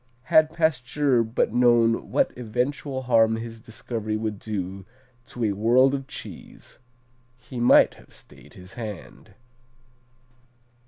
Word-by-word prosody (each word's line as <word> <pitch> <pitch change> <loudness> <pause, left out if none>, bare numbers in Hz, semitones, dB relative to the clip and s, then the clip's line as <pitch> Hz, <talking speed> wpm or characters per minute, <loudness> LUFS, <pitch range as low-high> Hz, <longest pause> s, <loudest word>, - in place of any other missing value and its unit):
Had 155 +5 +4
Pasteur 145 -5 +1
but 110 -1 -1
known 120 -2 +3
what - - 0
eventual 130 +3 -3
harm 115 -3 +3
his 115 0 -7
discovery 110 -1 -5
would 110 -2 -4
do 95 -3 -5 0.4
to 120 - -6
a 105 - +1
world 120 +6 +3
of 135 -1 -4
cheese, - - -11 0.6
he 125 0 -9
might 120 - +5
have - - -20
stayed - - -16
his 90 +1 -13
hand. 110 -6 -9
115 Hz, 120 wpm, -24 LUFS, 110-130 Hz, 0.6 s, might